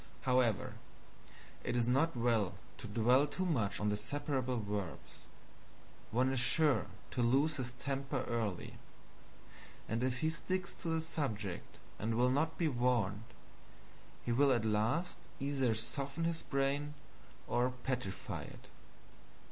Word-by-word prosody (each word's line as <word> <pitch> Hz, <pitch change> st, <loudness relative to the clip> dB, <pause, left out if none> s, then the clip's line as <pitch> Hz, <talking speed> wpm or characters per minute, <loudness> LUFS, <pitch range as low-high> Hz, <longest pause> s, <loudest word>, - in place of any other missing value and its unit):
However, 125 Hz, -5 st, +2 dB, 0.9 s
it 120 Hz, -, -1 dB
is 120 Hz, -, +3 dB
not 135 Hz, +4 st, +2 dB
well 115 Hz, -5 st, +2 dB, 0.2 s
to 120 Hz, -, -6 dB
dwell 120 Hz, +7 st, +4 dB
too 185 Hz, +6 st, -2 dB
much 110 Hz, -, +1 dB
on 105 Hz, -, +1 dB
the 105 Hz, -, +2 dB
separable 130 Hz, +1 st, -1 dB
verbs. 100 Hz, -4 st, -5 dB, 0.8 s
One 130 Hz, +3 st, +2 dB
is 135 Hz, -, +1 dB
sure 145 Hz, -1 st, +3 dB, 0.2 s
to 125 Hz, -, 0 dB
lose 140 Hz, +6 st, +3 dB
his 125 Hz, -2 st, -3 dB
temper 135 Hz, 0 st, -2 dB
early; 110 Hz, -6 st, -2 dB, 1.1 s
and 115 Hz, +2 st, -1 dB
if 130 Hz, -1 st, 0 dB
he 155 Hz, 0 st, +2 dB
sticks 185 Hz, +3 st, -2 dB
to 175 Hz, -, -4 dB
the 160 Hz, 0 st, +1 dB
subject, 110 Hz, -, -3 dB, 0.2 s
and 110 Hz, +2 st, 0 dB
will 125 Hz, +2 st, +4 dB
not 160 Hz, +4 st, +1 dB
be 170 Hz, -, +2 dB
warned, 120 Hz, -6 st, +1 dB, 1.0 s
it 120 Hz, -, 0 dB
will 135 Hz, +4 st, +5 dB
at 120 Hz, -3 st, +2 dB
last 110 Hz, +12 st, +1 dB, 0.2 s
either 135 Hz, -4 st, +1 dB
soften 135 Hz, +7 st, -3 dB
his 165 Hz, 0 st, 0 dB
brain 140 Hz, +2 st, 0 dB, 0.5 s
or 120 Hz, +1 st, +2 dB
petrify 125 Hz, -6 st, -3 dB
it. -, -, -11 dB
125 Hz, 135 wpm, -35 LUFS, 115-145 Hz, 1.1 s, will